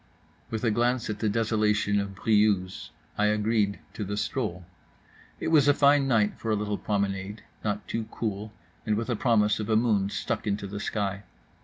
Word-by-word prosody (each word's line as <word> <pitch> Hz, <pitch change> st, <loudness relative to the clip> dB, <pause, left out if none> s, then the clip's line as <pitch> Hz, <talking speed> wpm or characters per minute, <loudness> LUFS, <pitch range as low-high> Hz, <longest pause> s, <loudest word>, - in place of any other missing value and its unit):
With 110 Hz, 0 st, -4 dB
a 115 Hz, -, +3 dB
glance 120 Hz, +1 st, +1 dB
at 105 Hz, -, -6 dB
the 110 Hz, -, +1 dB
desolation 105 Hz, -2 st, +1 dB
of 100 Hz, -1 st, -4 dB
Briouse 105 Hz, -3 st, +1 dB, 0.3 s
I 105 Hz, -, +4 dB
agreed 105 Hz, -1 st, +1 dB, 0.2 s
to 105 Hz, -, -4 dB
the 105 Hz, +1 st, -3 dB
stroll. 105 Hz, -7 st, -2 dB, 0.7 s
It -, -, -2 dB
was 150 Hz, -3 st, +5 dB
a 145 Hz, -, +5 dB
fine 140 Hz, -1 st, +4 dB
night 110 Hz, -5 st, +2 dB
for 115 Hz, -, -4 dB
a 110 Hz, -, +3 dB
little 105 Hz, 0 st, -2 dB
promenade; 100 Hz, 0 st, -2 dB, 0.2 s
not 105 Hz, -1 st, -2 dB
too 115 Hz, -1 st, -2 dB
cool, 105 Hz, -2 st, -4 dB, 0.3 s
and 110 Hz, -2 st, +1 dB
with 115 Hz, +2 st, -2 dB
a -, -, +1 dB
promise 105 Hz, -3 st, +2 dB
of 105 Hz, -, -4 dB
a 110 Hz, -, +3 dB
moon 110 Hz, -4 st, +2 dB
stuck 110 Hz, +1 st, -3 dB
into 100 Hz, 0 st, -1 dB
the 100 Hz, +1 st, -5 dB
sky. 100 Hz, -1 st, -2 dB
105 Hz, 185 wpm, -27 LUFS, 100-115 Hz, 0.7 s, was